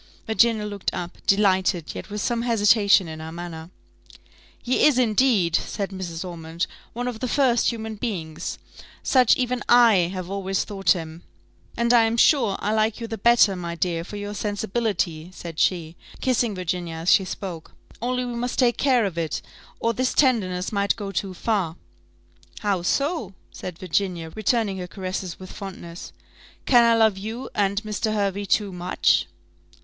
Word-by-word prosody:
Virginia 220 -1 +2
looked 205 -2 -3
up 175 0 -5
delighted, 190 -4 +2
yet - - -8
with 210 +1 -4
some 235 +1 0
hesitation 210 -4 +4
in 160 0 -7
her 160 0 -7
manner. 165 -1 -7 0.9
"He 250 - 0
is, 290 -4 +3
indeed," 220 -7 +3
said 200 -2 -2
Mrs. 185 -2 -5
Ormond, 165 0 -4 0.3
"one 245 +2 -3
of 240 -3 -4
the 255 - -2
first 245 -2 +2
of - - +5
human 220 -2 -5
beings: 175 -9 -4 0.5
such 255 -3 +4
even 250 -1 -1
I 225 -8 +6
have 185 -2 -5
always 195 0 -1
thought 195 -2 +2
him; 165 -1 -7 0.6
and 235 0 +2
I 230 -2 +6
am 225 +1 0
sure 235 -6 +4
I 210 - 0
like 220 +1 +1
you 230 - -4
the 225 -1 -6
better, 230 -3 +5
my 170 -1 -5
dear, 170 -1 -1
for 200 - -9
your 205 0 -5
sensibility," 205 -5 -2
said 165 -1 -7
she, 170 -3 +1 0.2
kissing 240 -4 +1
Virginia 175 -2 -3
as 165 +2 +1
she 195 - +6
spoke; 180 -3 -7 0.3
"only 250 +1 -1
we 245 - -4
must 240 +1 -3
take 245 -2 +3
care 255 -5 +3
of 175 -4 -3
it, 160 -2 -3 0.4
or 230 - +1
this 255 +3 -1
tenderness 195 -10 +2
might 200 -1 +1
go 205 -3 -5
too 190 0 -3
far." 190 -6 -1 0.9
"How 200 -4 0
so?" 275 - -1 0.2
said 180 -3 -7
Virginia, 180 -2 -2
returning 215 -2 0
her 180 - -5
caresses 185 -1 -5
with 185 -1 -10
fondness: 180 -4 -8 0.5
"can 240 -3 +6
I 230 0 +5
love 220 -4 +3
you 225 +6 -6
and 200 +1 0
Mr. 215 +1 -2
Hervey 200 -1 -1
too 200 0 +1
much?" 180 +1 +1
200 Hz, 170 wpm, -24 LUFS, 180-230 Hz, 0.9 s, I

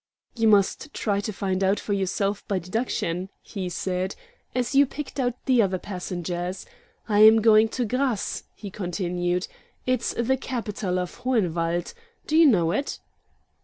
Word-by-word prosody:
"You 225 -2 +2
must 210 +7 +2
try 200 -2 0
to 210 +2 -3
find 190 -1 -1
out 195 +2 +2
for 205 - -3
yourself 195 +1 -1
by 200 - 0
deduction," 185 -2 -2
he 190 -4 -5
said, 180 +1 -2 0.4
"as 250 +1 0
you 280 0 +6
picked 285 +1 -7
out 245 -2 0
the 255 -3 +4
other 190 -3 +1
passengers. 180 -1 -4 0.4
I 210 -2 +2
am 220 +1 +8
going 220 0 +5
to 245 +1 -1
Grasse," 250 -1 -1
he 200 -3 -8
continued. 180 -1 -2 0.4
"It's 255 -2 0
the 255 +3 +1
capital 215 -7 -3
of 180 -1 -4
Hohenwald. 175 -9 0 0.3
Do 310 - -1
you 325 -1 +7
know 175 - +3
it?" 280 +10 -2
205 Hz, 155 wpm, -25 LUFS, 180-235 Hz, 0.4 s, am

